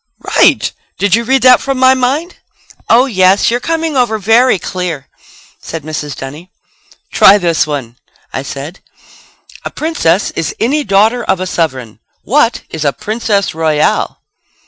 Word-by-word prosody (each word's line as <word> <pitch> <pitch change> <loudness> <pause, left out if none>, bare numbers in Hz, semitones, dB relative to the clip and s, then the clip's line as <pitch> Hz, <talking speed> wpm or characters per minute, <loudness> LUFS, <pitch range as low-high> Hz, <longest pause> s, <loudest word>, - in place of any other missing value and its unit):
"Right! - - +3 0.3
Did 200 -2 0
you 230 +2 +3
read 265 +2 +1
that 255 -1 +6
from 275 -1 -2
my 260 0 +5
mind?" 270 +7 -2 0.5
"Oh, 245 +3 +5
yes, 190 -4 +2
you're 240 - 0
coming 325 +2 -2
over 240 -4 +1
very 225 +3 +3
clear!" 175 -7 -5 0.5
said 165 -3 -7
Mrs. 150 -1 -5
Dunny. 150 +7 -9 0.6
"Try 200 - +6
this 170 -4 0
one," 130 -6 -5 0.4
I 135 - -3
said. 140 +6 -8 0.8
"A - - -4
princess 210 - -1
is 165 -1 -4
any 290 +6 0
daughter 220 +3 +2
of 190 -3 0
a 185 - -3
sovereign. 130 - -3 0.2
What 250 -1 +1
is 160 -2 -4
a 140 -2 +1
princess 210 -2 -2
royal?" 155 -2 0
200 Hz, 145 wpm, -13 LUFS, 160-250 Hz, 0.8 s, that